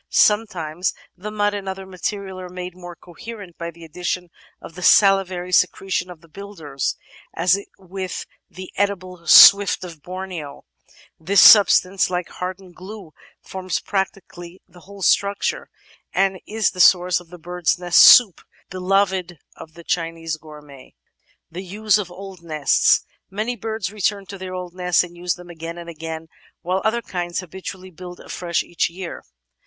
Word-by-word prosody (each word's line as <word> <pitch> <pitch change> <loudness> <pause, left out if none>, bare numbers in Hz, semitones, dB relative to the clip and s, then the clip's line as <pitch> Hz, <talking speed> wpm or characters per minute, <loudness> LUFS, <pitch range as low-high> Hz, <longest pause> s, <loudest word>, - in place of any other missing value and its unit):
Sometimes 185 -6 +1 0.2
the 195 +4 -7
mud 205 -1 0
and 200 -1 -5
other 190 0 -6
materials 190 0 -5
are 180 -1 -8
made 180 0 -7
more 175 -1 -10
coherent 195 +1 -11
by 170 0 -4
the 170 0 -14
addition 175 +1 -4 0.3
of - - -12
the 180 - -10
salivary 190 -2 +3
secretion 180 0 +1
of 175 -3 -12
the 165 - -19
builders, 160 -6 -5 0.4
and 175 +2 +1 0.3
with 190 -1 -6 0.2
the 185 0 -10
Edible 185 -3 -3
Swift 200 -1 +8
of 165 -4 -10
Borneo 180 -5 -7 0.5
this 190 +5 +2
sub 205 +1 +9
stance, 185 +1 +2
like 180 -1 -3
hardened 185 0 -7
glue, 185 -2 -11 0.3
forms 185 -1 -4
practically 190 -2 -5
the 180 -1 -18
whole 195 +2 -11
structure 200 +3 +1 0.4
and 195 -1 +1
is 220 0 0
the 185 - -11
source 180 0 +5
of 175 -2 -17
the 180 - -11
"bird's 175 +1 -1
nest 175 -1 +3
soup" 220 -8 +8 0.3
beloved 185 -1 0 0.2
of 160 0 -13
the 170 - -12
Chinese 165 -1 -3
gourmet. 150 -3 -14 0.6
The 175 +3 -6
Use 210 +2 +1
of 190 -4 -5
Old 190 0 -11
Nests 155 -4 +2 0.2
Many 215 +5 -3
birds 220 -2 -4
return 205 -1 -1
to 195 - -8
their 185 0 -6
old 180 -1 -7
nests 180 -1 +1
and 175 -1 -11
use 175 0 -2
them 175 0 -12
again 165 0 -8
and 170 0 -9
again, 160 0 -7 0.4
while 185 +2 -1
other 235 +2 0
kinds 175 0 -4
habitually 185 +1 -9
build 180 +1 -11
afresh 170 -2 -3
each 175 - -1
year. 175 +1 -8
180 Hz, 160 wpm, -21 LUFS, 175-195 Hz, 0.6 s, sub